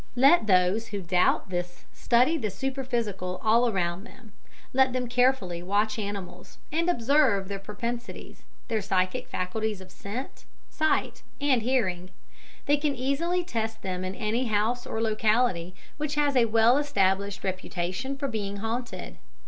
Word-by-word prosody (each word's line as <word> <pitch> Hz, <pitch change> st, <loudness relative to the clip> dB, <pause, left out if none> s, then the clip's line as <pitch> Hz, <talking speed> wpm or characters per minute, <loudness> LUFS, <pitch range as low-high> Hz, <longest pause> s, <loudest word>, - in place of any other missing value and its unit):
Let 270 Hz, 0 st, +5 dB
those 185 Hz, +4 st, +3 dB
who 205 Hz, -3 st, -4 dB
doubt 180 Hz, +1 st, +2 dB
this 175 Hz, 0 st, -4 dB
study 250 Hz, +7 st, +3 dB
the 230 Hz, -9 st, -1 dB
superphysical 230 Hz, -6 st, -3 dB
all 235 Hz, +2 st, +4 dB
around 180 Hz, -2 st, -1 dB
them. 235 Hz, -2 st, -15 dB, 0.4 s
Let 265 Hz, -1 st, +4 dB
them 250 Hz, -1 st, -1 dB
carefully 245 Hz, -8 st, +1 dB
watch 210 Hz, +4 st, 0 dB
animals, 195 Hz, -3 st, -6 dB
and 335 Hz, +3 st, +1 dB
observe 245 Hz, -, +3 dB
their 200 Hz, 0 st, -4 dB
propensities, 235 Hz, +4 st, -6 dB, 0.3 s
their 225 Hz, -3 st, 0 dB
psychic 185 Hz, -2 st, 0 dB
faculties 210 Hz, +3 st, -2 dB
of 185 Hz, -1 st, -13 dB
scent, 230 Hz, +7 st, -7 dB, 0.3 s
sight, 315 Hz, 0 st, 0 dB, 0.2 s
and 275 Hz, -4 st, +2 dB
hearing. 190 Hz, -8 st, 0 dB, 0.6 s
They 290 Hz, +1 st, +3 dB
can 290 Hz, -1 st, -1 dB
easily 310 Hz, +8 st, 0 dB
test 225 Hz, -8 st, -3 dB
them 185 Hz, -1 st, -3 dB
in 185 Hz, +1 st, -4 dB
any 230 Hz, +2 st, -1 dB
house 225 Hz, +4 st, 0 dB
or 225 Hz, -, -2 dB
locality 215 Hz, -5 st, +1 dB, 0.2 s
which 300 Hz, -1 st, -2 dB
has 290 Hz, -2 st, +2 dB
a 245 Hz, -2 st, +5 dB
well 230 Hz, +4 st, +4 dB
established 200 Hz, -8 st, 0 dB
reputation 185 Hz, +6 st, -3 dB
for 280 Hz, -, -2 dB
being 205 Hz, -5 st, -3 dB
haunted. 230 Hz, +4 st, -5 dB
220 Hz, 145 wpm, -27 LUFS, 190-255 Hz, 0.6 s, Let